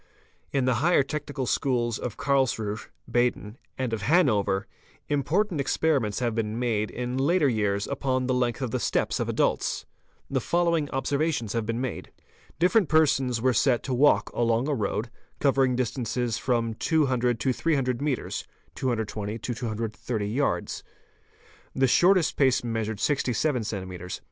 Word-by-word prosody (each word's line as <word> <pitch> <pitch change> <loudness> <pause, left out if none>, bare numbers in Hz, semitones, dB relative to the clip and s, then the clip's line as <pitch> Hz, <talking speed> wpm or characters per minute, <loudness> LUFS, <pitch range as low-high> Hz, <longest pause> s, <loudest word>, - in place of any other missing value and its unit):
— - - -38
In 130 - +2
the 130 - +3
higher 170 -2 +4
technical 145 -1 -4
schools 120 -3 0
of 120 -4 -5
Karlsruhe 120 -6 0 0.2
(Baden) 120 -2 0 0.2
and 130 -3 -2
of 110 - -2
Han 155 - +4
over, 100 -2 0 0.4
important 155 +4 +1
experiments 135 -6 +1
have 120 -2 0
been 110 -1 -2
made 115 -4 0
in 125 +1 -3
later 155 +3 +3
years 105 -4 0
upon 130 -2 -1
the 130 - +1
length 125 0 0
of 125 - -2
the - - -1
steps - - 0
of - - -1
adults. - - 0 0.4
The - - -1
following 170 -4 +1
observations 140 -4 -1
have 115 -2 -2
been 115 +1 -1
made. 130 0 -4 0.5
Different 180 +2 +3
persons 135 -6 +2
were 130 -1 +3
set 120 +1 +2
to 130 - -2
walk 140 +4 +3
along 115 +2 +1
a 150 - +1
road, 110 0 -2 0.3
covering 135 -2 +3
distances 125 -1 -1
from 115 -3 0
200 125 -4 +1
to 130 +1 +1
300 135 -5 0
metres 145 -3 -2 0.3
(220 110 -4 -2
to 120 +2 -4
330 110 -2 -3
yards). 135 +7 -1 0.9
The 135 - +3
shortest 175 +6 +4
pace 130 -4 +3
measured 110 -3 -2
67 135 -1 +1
cms. 95 -4 -5
125 Hz, 150 wpm, -26 LUFS, 115-140 Hz, 0.9 s, higher